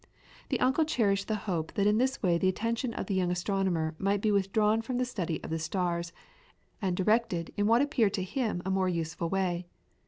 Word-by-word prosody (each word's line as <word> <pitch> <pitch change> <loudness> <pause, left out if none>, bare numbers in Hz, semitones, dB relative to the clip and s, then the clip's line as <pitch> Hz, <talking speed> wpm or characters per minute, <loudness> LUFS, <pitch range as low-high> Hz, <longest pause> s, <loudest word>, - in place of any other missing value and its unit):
The - - 0
uncle 265 +5 +3
cherished 200 -10 +1
the 220 - 0
hope 165 -6 -2
that 200 - +1
in 210 +1 +4
this 260 +1 0
way 175 -3 +3
the 190 - +2
attention 230 +5 -1
of - - -3
the 200 - -2
young 185 -2 +1
astronomer 180 -3 0
might 200 +1 +1
be 215 +1 +1
withdrawn 210 +2 +2
from 245 +2 -3
the 255 - +1
study 180 -9 -3
of - - -6
the 160 - -1
stars 170 +1 -2 0.7
and 185 -3 0
directed 195 -4 +1
in 205 0 +1
what 230 +4 +5
appeared 235 -8 +1
to 190 - -1
him 210 -2 -2
a 190 - -1
more 190 -1 +2
useful 165 -1 -2
way. 180 -2 -1
195 Hz, 210 wpm, -29 LUFS, 175-220 Hz, 0.7 s, what